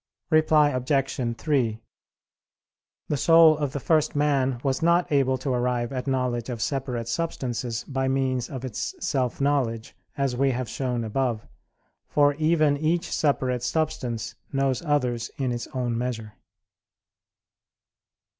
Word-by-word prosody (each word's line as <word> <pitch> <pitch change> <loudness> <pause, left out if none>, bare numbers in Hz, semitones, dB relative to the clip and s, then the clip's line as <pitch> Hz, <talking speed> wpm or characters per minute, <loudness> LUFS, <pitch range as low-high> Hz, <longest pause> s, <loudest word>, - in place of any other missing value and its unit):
Reply 155 -1 +5
Obj. 130 -2 -1
3: 115 -4 0 1.3
The 150 - -1
soul 165 +2 +6
of 145 -3 -1
the 145 - -3
first 155 +2 +1
man 135 -4 +1
was 135 -1 0
not 170 +1 +3
able 135 -2 +2
to 130 +1 -3
arrive 125 0 -1
at 130 +1 -4
knowledge 125 -3 -1
of 120 -2 -4
separate 125 -2 -2
substances 120 -5 -3
by 135 -1 -2
means 130 -2 0
of 130 -3 -6
its 120 -5 -4
self 130 -3 -1
knowledge, 130 -6 0 0.2
as 135 -3 0
we 135 +2 +2
have 125 -1 -2
shown 125 0 -2
above; 115 0 -1 0.6
for 145 -1 +3
even 155 -2 +3
each 165 +4 0
separate 130 -4 +1
substance 125 -5 -2 0.2
knows 135 -2 0
others 125 -6 0
in 130 -3 -1
its 120 -1 -4
own 125 -2 -2
measure. 115 -3 -3
130 Hz, 135 wpm, -25 LUFS, 120-145 Hz, 1.3 s, soul